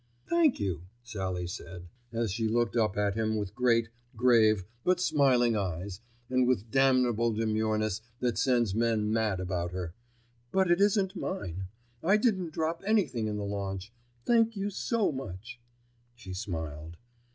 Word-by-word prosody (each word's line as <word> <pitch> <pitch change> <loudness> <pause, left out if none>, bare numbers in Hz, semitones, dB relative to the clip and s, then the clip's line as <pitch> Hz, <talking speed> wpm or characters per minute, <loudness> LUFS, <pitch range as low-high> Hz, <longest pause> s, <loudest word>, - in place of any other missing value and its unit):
"Thank 335 -5 +3
you," 90 -3 -3 0.2
Sallie 95 -7 -3
said, 90 0 -8 0.2
as 115 -3 -1
she 110 +2 -1
looked 120 +1 +1
up 110 -4 +1
at 100 -1 +1
him 110 0 0
with 100 -2 -3
great, 115 -2 +2 0.3
grave, 110 -4 +4 0.2
but 180 0 +2
smiling 130 -8 +3
eyes 95 0 -3 0.3
and 130 0 +2
with 125 -6 +2
that 110 +1 -21
damnable 125 -3 +3
demureness 110 -1 0 0.2
that 125 -2 0
sends 120 -6 +2
men 110 -1 +1
mad 110 -4 +1
about 90 -1 -2
her, 90 -3 -4 0.6
"but 190 -2 +2
it 175 +3 +3
isn't 200 -2 +2
mine. 95 - -4 0.4
I 195 +5 +4
didn't 195 -7 +1
drop 160 +1 -2
anything 195 - +1
in 105 -1 -2
the 105 - -3
launch. 100 +1 -4 0.3
Thank 230 -1 +3
you 200 +1 -2
so 225 +1 0
much," 120 -3 -7 0.6
she 100 -6 -9
smiled. 80 -5 -5
110 Hz, 150 wpm, -29 LUFS, 95-135 Hz, 0.6 s, grave